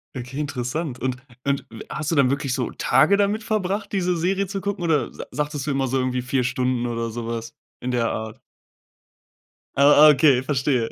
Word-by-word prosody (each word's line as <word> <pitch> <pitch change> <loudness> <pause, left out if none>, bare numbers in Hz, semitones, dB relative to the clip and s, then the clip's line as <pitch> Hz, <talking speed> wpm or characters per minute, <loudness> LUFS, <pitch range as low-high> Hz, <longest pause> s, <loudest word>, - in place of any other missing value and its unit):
Okay, 125 +3 -6
interessant 140 0 -3
und 130 -1 -2 0.3
und 140 0 -1
w 115 - -9
hast 155 +1 -3
du - - +1
dann 135 -3 +4
wirklich 140 -2 -1
so 125 -2 -2
Tage 200 +6 +3
damit 205 +2 +1
verbracht 205 -2 -2
diese 180 -3 0
Serie 190 +3 0
zu 195 0 -4
gucken 200 -3 -3
oder 160 -4 +1
sa - - -8
sagtest 150 -1 -3
du - - +1
immer 135 -1 0
so 135 +2 0
irgendwie 130 0 -1
4 130 0 0
Stunden 125 -1 0
oder 115 -1 -2
sowas 115 0 -5 0.3
in 125 +1 -2
der 120 -2 +1
Art? 110 0 -5 1.4
Ah 145 +2 +7
ah, - - +9
okay 135 -2 +4
verstehe. 130 -3 0
135 Hz, 190 wpm, -23 LUFS, 125-160 Hz, 1.4 s, ah